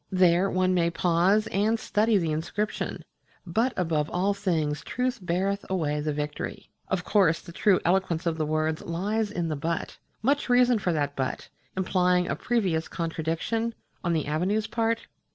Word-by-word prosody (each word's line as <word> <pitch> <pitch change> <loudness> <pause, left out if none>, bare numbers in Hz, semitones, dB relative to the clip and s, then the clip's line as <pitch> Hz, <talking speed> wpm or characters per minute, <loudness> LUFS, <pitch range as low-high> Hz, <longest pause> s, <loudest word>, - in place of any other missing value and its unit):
There 185 0 +4
one 185 0 +2
may 170 -2 +2
pause 175 +5 +2
and 215 +3 +2
study 215 0 +2
the 165 -4 0
inscription 170 +7 -3 0.4
But 225 +9 +1
Above 160 -4 0
All 190 +3 +1
Things 160 -7 -1
Truth 250 -1 -2
Beareth 190 +3 0
Away 155 -6 0
the 150 +1 -1
Victory... 150 0 -5 0.2
of 185 -2 -1
course 180 -5 +3
the - - -11
true 190 +2 +3
eloquence 180 -1 +1
of 165 -1 -1
the 155 - +1
words 155 0 0
lies 205 +6 -1
in 175 -5 -2
the 155 - -1
But. 165 +4 -3 0.2
Much 280 +2 +1
reason 245 -1 +5
for 180 - 0
that 145 -3 -1
But, 130 -1 -3 0.3
implying 180 -1 +2
a - - -1
previous 190 -9 0
contradiction 165 +8 -2 0.3
on 170 -1 +1
the 160 -2 0
Avenue's 185 +8 0
part? 230 0 -1
180 Hz, 165 wpm, -27 LUFS, 160-205 Hz, 0.4 s, reason